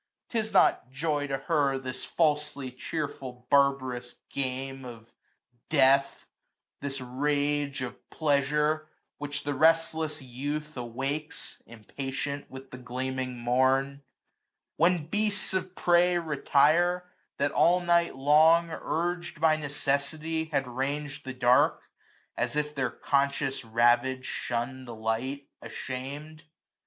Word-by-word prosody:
*T 230 - 0
is 220 0 -2
not 190 - +4
joy 145 +1 -1
to 135 -1 -1
her, 145 -4 +1
This 130 -1 -5
falsely 150 -4 0
cheerful 130 -2 -5
barb'rous 135 -3 +2 0.2
game 135 0 -3
of 115 -2 -11 0.6
death; 140 -2 +3 0.5
This 140 -1 -4
rage 145 +2 -1
of 125 - -8
pleasure, 150 +1 +1 0.3
which 145 0 -4
the 145 - -1
restless 160 +1 +2
youth 145 +4 -5
385 125 - -5
Awakes, 135 +6 -4
impatient, 135 +5 -5
with 130 0 -11
the 125 - -8
gleaming 130 0 -3
morn 130 +3 +2
j - - -21 0.8
When 170 -1 +3
beasts 205 +2 -1
of 185 -1 -2
prey 175 0 +4
retire, 170 +3 +2 0.3
that 145 +1 +1
all 175 +2 +4
night 170 -2 +2
long, 155 +5 +5
UrgM 175 +1 -3
by 160 0 +4
necessity, 150 +2 -2
had 145 -4 -1
rang'd 140 +4 -3
the 130 - -5
dark; 125 +5 +4 0.5
As - - -1
if 150 0 -1
their 135 -4 0
conscious 140 0 0
ravage 120 +3 +2
shun'd 125 +2 -3
the 120 - -7
light, 115 +6 -2
Asham'd. 145 +5 -6
140 Hz, 120 wpm, -28 LUFS, 130-155 Hz, 0.8 s, long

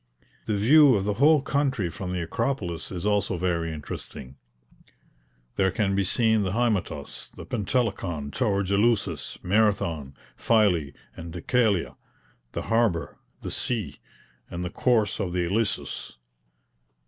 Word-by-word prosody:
The 105 - 0
view 135 +5 +6
of 100 - 0
the 105 +1 0
whole 150 -1 +6
country 135 -8 0
from 90 +1 -5
the 90 -2 -2
Acropolis 90 -3 -2
is 90 0 -5
also 100 -2 +1
very 85 -2 -1
interesting; 70 -3 -8 1.2
there 95 -1 +3
can 100 0 0
be 100 0 +2
seen 110 +3 +2
the 95 -2 -1
Hymetos, 115 -4 -1
the - - -9
Pentelikon, 95 - -2
towards 100 +1 0
Eleusis, 100 - +1
Marathon, 95 -8 +1 0.2
Phylae, 90 -11 +2 0.2
and 85 0 -8
Dekelea, 100 +2 0 0.6
the - - -3
harbour, 115 -7 0 0.2
the - - -4
sea, 105 - -2 0.5
and 90 +1 -4
the 90 - -4
course 110 -5 +1
of 95 -4 -2
the 90 -1 0
Ilissus. 100 - -2
100 Hz, 130 wpm, -26 LUFS, 85-110 Hz, 1.2 s, view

